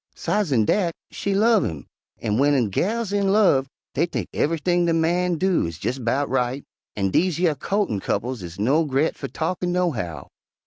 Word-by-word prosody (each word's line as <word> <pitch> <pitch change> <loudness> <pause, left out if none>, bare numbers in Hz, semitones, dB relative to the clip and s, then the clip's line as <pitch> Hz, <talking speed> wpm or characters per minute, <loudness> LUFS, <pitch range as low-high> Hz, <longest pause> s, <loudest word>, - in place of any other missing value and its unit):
Sidesen 145 - +1
dat, 175 - +1 0.2
she 200 -1 -2
love' 220 +1 +4
him, 80 -4 -4 0.3
an' 105 -2 -1
w'en 135 -4 +3
gals 215 - -1
is 205 - +2
in 195 -1 +2
love 185 -11 +4 0.3
dey 165 +5 +1
think - - -4
ev'ything 170 +3 +1
de 165 - +2
man 175 +2 +1
do 185 - +1
is 85 +1 -8
jes' 130 +2 -1
'bout 130 +4 0
right, 130 +1 -1 0.3
an' 95 -2 0
dese 180 - +2
yer 170 -3 +2
co'tin' 195 - -1
couples 120 +4 -2
is 85 -1 -8
no 135 +11 +2
gre't 145 +1 0
fer - - -6
talkin,' 175 +2 -2
nohow. 115 - -2
155 Hz, 180 wpm, -23 LUFS, 125-180 Hz, 0.3 s, love